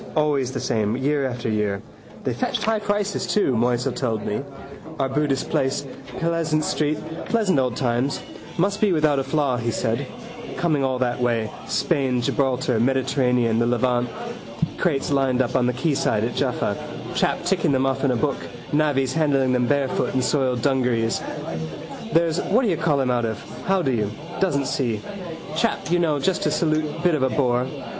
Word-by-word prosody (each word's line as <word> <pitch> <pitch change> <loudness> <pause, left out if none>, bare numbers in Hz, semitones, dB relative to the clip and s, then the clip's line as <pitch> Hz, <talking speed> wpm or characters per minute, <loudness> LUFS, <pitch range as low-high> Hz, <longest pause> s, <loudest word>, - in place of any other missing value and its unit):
Always 145 -4 +2
the 130 - -3
same, 110 -1 0
year 140 +1 +1
after 120 -2 -4
year. 105 -2 0 0.4
They - - 0
fetched - - -1
high 220 0 +2
prices 205 -1 -1
too, 180 -6 +2
Moisel 120 +1 +1
told 115 -5 -1
me. 105 - -1 0.6
Arbutus 135 +1 +1
place: 135 +1 0 0.3
Pleasants 165 -2 0
street: 150 0 0 0.3
pleasant 210 -10 +2
old 125 -3 0
times. 125 +2 0 0.4
Must 200 +4 +1
be 205 -4 +4
without 155 -3 +3
a - - 0
flaw, 140 -4 +1
he 120 0 -1
said. - - -1 0.5
Coming 155 -5 +1
all 130 -1 +1
that 125 -1 -1
way: 115 -3 +1 0.2
Spain, 135 -7 +1
Gibraltar, 125 -1 +1
Mediterranean, 125 -2 +2
the 120 - +2
Levant. 120 0 +1 0.7
Crates 145 -6 0
lined 135 -2 +2
up 130 0 +1
on 125 -1 +3
the 125 - +1
quayside 130 -6 +1
at 120 +1 -1
Jaffa, - - 0 0.4
chap - - +1
ticking - - +2
them 135 -1 +2
off 135 +1 0
in 140 - +3
a 125 - +2
book, 115 - 0 0.4
navvies 145 -3 +2
handling 140 -5 +2
them 125 -1 +2
barefoot 140 -2 0
in 130 - +3
soiled 130 -5 +1
dungarees. 125 -5 +1 0.9
There's 165 0 +2
whatdoyoucallhim 160 - +2
out 120 -1 +1
of. 110 -2 -2 0.3
How 190 -1 +3
do 135 - +1
you? 105 -4 0 0.3
Doesn't 140 -8 +1
see. 120 -6 -1 0.6
Chap 220 -1 0
you 175 - +3
know 160 -4 +2
just 185 +6 0
to - - +2
salute 155 +1 0
bit 175 -1 +4
of 150 - +1
a 130 - +3
bore. 125 -2 +1
135 Hz, 165 wpm, -23 LUFS, 125-155 Hz, 0.9 s, be